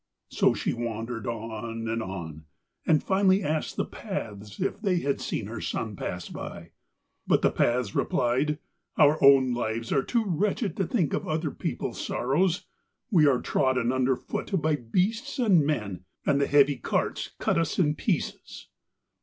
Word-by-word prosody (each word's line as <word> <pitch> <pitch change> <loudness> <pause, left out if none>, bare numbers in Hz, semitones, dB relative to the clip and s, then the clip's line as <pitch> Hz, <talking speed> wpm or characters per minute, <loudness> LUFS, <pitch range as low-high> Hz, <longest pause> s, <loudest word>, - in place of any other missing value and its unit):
So - - +3
she - - -1
wandered 115 -1 -4
on 115 0 -4
and 115 +1 -1
on, 80 -6 -6 0.4
and 155 -2 +4
finally 190 0 +3
she - - -5
asked 155 +1 -1
the - - 0
Paths 105 -1 -6
if - - -2
they 185 -5 +1
had 140 0 -1
seen 105 - -3
her 110 +2 -6
son 110 -2 -3
pass 90 -1 -5
by. - - -8 0.6
But - - +3
the - - +4
Paths 120 -4 +1
replied: 130 +5 +1 0.4
'Our 150 0 +5
own 135 -2 +7
lives 115 -1 -2
are 135 - +3
too 230 - 0
wretched 200 +4 0
to 190 - 0
think 180 - 0
of - - -2
other 155 -1 -1
people's - - -4
sorrows. 175 +8 0 0.5
We 160 -7 +5
are 130 -3 +3
trodden 130 -3 +1
under 130 0 +2
foot 190 +8 -3
by 155 -1 +1
beasts 195 - -1
and 200 - +4
men, 105 -11 -2 0.2
and 140 0 +3
the 140 - +2
heavy 145 -1 +4
carts - - -1
cut - - +1
us 165 - -1
in 150 -5 +3
pieces.' - - -3
135 Hz, 165 wpm, -27 LUFS, 115-165 Hz, 0.6 s, own